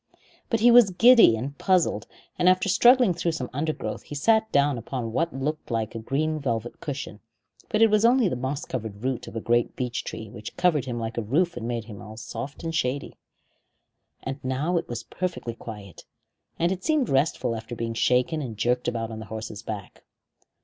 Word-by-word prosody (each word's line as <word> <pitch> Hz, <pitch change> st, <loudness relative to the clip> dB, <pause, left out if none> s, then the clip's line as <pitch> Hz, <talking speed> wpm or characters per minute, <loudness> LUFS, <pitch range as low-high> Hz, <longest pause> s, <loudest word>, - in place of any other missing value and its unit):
But 230 Hz, -2 st, 0 dB
he 240 Hz, +1 st, +7 dB
was 235 Hz, -4 st, +8 dB
giddy 225 Hz, -, +7 dB
and 135 Hz, +5 st, -5 dB
puzzled, 180 Hz, -, +2 dB, 0.3 s
and 180 Hz, 0 st, +5 dB
after 185 Hz, +1 st, +3 dB
struggling 240 Hz, +1 st, +5 dB
through 170 Hz, 0 st, -1 dB
some 130 Hz, -6 st, -4 dB
undergrowth 155 Hz, +3 st, -3 dB
he 145 Hz, -, -9 dB
sat 220 Hz, +8 st, +2 dB
down 140 Hz, -3 st, +2 dB
upon 115 Hz, 0 st, -4 dB
what 165 Hz, +8 st, 0 dB
looked 145 Hz, +4 st, -4 dB
like 115 Hz, -2 st, -2 dB
a 115 Hz, -, -5 dB
green 155 Hz, +7 st, -1 dB
velvet 120 Hz, -4 st, -3 dB
cushion; 140 Hz, -9 st, -6 dB, 0.5 s
but 225 Hz, -1 st, +3 dB
it 225 Hz, -, +5 dB
was 215 Hz, 0 st, +3 dB
only 240 Hz, -1 st, +5 dB
the 175 Hz, -, -1 dB
moss 135 Hz, +4 st, -3 dB
covered 110 Hz, -4 st, -5 dB
root 130 Hz, -1 st, -2 dB
of -, -, -10 dB
a -, -, -1 dB
great 120 Hz, +1 st, +1 dB
beech 125 Hz, -2 st, -3 dB
tree, 110 Hz, -, -6 dB
which 105 Hz, 0 st, -9 dB
covered 175 Hz, -6 st, +2 dB
him 120 Hz, -2 st, -4 dB
like 115 Hz, 0 st, -3 dB
a -, -, -1 dB
roof 160 Hz, -, +1 dB
and 120 Hz, -1 st, -5 dB
made 120 Hz, -2 st, -3 dB
all 105 Hz, 0 st, -10 dB
soft 120 Hz, +7 st, -7 dB
and 165 Hz, 0 st, -3 dB
shady. 140 Hz, -3 st, -1 dB, 1.1 s
And 135 Hz, +1 st, -5 dB
now 135 Hz, +7 st, -1 dB
it 165 Hz, -, -2 dB
was 120 Hz, -1 st, -4 dB
perfectly 175 Hz, -10 st, -4 dB
quiet, 105 Hz, -5 st, -10 dB, 0.5 s
and 170 Hz, +2 st, +1 dB
it 190 Hz, -1 st, -4 dB
seemed 305 Hz, -4 st, +2 dB
restful 135 Hz, -4 st, +1 dB
after 115 Hz, +2 st, -7 dB
being 115 Hz, 0 st, -3 dB
shaken 125 Hz, +7 st, +1 dB
and 115 Hz, -6 st, -6 dB
jerked 125 Hz, +3 st, 0 dB
about 115 Hz, -1 st, -2 dB
on 110 Hz, -, -6 dB
the 110 Hz, -, -7 dB
horse's 110 Hz, 0 st, -6 dB
back. 105 Hz, -4 st, -7 dB
130 Hz, 200 wpm, -25 LUFS, 115-170 Hz, 1.1 s, was